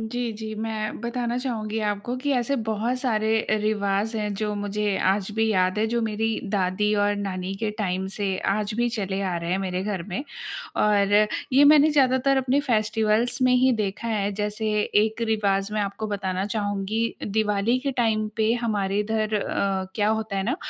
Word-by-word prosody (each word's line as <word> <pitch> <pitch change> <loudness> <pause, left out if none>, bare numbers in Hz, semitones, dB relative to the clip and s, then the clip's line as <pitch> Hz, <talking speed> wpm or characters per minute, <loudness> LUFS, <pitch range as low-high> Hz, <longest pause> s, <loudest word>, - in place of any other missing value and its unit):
जी, 230 +1 -3
जी, 220 -1 -5
मैं 215 -1 -3
बताना 235 0 -2
चाहूँगी 225 -4 -3
आपको 205 +5 -3
कि 285 - 0
ऐसे 250 +3 0
बहुत 220 +4 0
सारे 220 -4 0 0.3
रिवाज़ 210 +1 0
हैं, 210 -1 -1
जो 210 +1 -2
मुझे 205 0 -1
आज 195 +1 +1
भी 220 0 +2
याद 185 0 +2
हैं, 220 - +2
जो 235 +1 0
मेरी 220 0 -1 0.2
दादी 200 +1 +1
और 205 0 +2
नानी 190 -1 -3
के 220 0 -2
टाइम 190 -2 -1
से 205 - -2 0.3
आज 210 +1 -1
भी 240 0 +2
चले 200 -4 -2
आ 185 -3 -1
रहे 170 0 -4
हैं 185 - +1
मेरे 185 0 -2
घर 195 -3 -3
में। 205 - -5 0.5
और 205 -1 +3 0.4
ये 275 +2 +6
मैंने 300 +1 +7
ज़्यादातर 270 -1 +3
अपने 265 +2 +2
फेस्टिवल्स 225 -1 +1
में 255 0 +4
ही 260 +1 +4
देखा 200 +3 -3
है, 205 -2 0
जैसे 210 +1 -2 0.4
एक 220 +1 -4
रिवाज़ 200 -2 +1
मैं 215 - +1
आपको 205 +2 -3
बताना 190 -2 -2
चाहूँगी, 205 +1 -1 0.2
दिवाली 210 +3 +1
के - - +3
टाइम 215 -2 +1
पे 220 0 +2
हमारे 200 -3 0
इधर 215 0 -1
अ, 195 -2 -1
क्या 210 -1 +1
होता 220 -2 -1
है 195 - 0
ना, 245 - -1
215 Hz, 185 wpm, -25 LUFS, 200-230 Hz, 0.5 s, मैंने